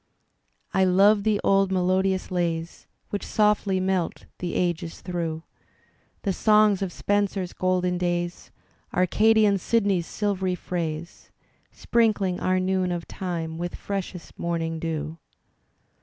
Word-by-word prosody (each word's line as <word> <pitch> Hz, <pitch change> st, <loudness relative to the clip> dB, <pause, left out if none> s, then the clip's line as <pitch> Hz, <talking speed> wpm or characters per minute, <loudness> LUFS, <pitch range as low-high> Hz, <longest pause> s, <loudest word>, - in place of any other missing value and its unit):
I 190 Hz, -, +3 dB
love 200 Hz, +3 st, +5 dB
the 210 Hz, 0 st, +1 dB
old 195 Hz, -1 st, +3 dB
melodious 185 Hz, +1 st, +1 dB
lays 170 Hz, -2 st, -2 dB, 0.2 s
Which 205 Hz, -, -2 dB
softly 210 Hz, -3 st, +2 dB
melt 185 Hz, -2 st, -1 dB
the 180 Hz, -, -3 dB
ages 170 Hz, -2 st, -1 dB
through, 165 Hz, -3 st, -3 dB, 0.8 s
The 195 Hz, -, 0 dB
songs 210 Hz, -1 st, +4 dB
of 190 Hz, -2 st, -2 dB
Spenser's 200 Hz, -2 st, -1 dB
golden 180 Hz, -1 st, 0 dB
days. 175 Hz, -1 st, -2 dB, 0.5 s
Arcadian 210 Hz, +2 st, +4 dB
Sidney's 200 Hz, -4 st, +1 dB
silvery 190 Hz, -3 st, -1 dB
phrase. 170 Hz, -2 st, -5 dB, 0.4 s
Sprinkling 210 Hz, -6 st, +1 dB
oiu* 185 Hz, 0 st, +1 dB
noon 185 Hz, -1 st, +1 dB
of 175 Hz, -1 st, -4 dB
time 165 Hz, -3 st, -4 dB
with 175 Hz, 0 st, -4 dB
freshest 195 Hz, -3 st, -6 dB
morning 165 Hz, -1 st, -2 dB
dew. 160 Hz, 0 st, -4 dB
185 Hz, 115 wpm, -25 LUFS, 175-200 Hz, 0.8 s, love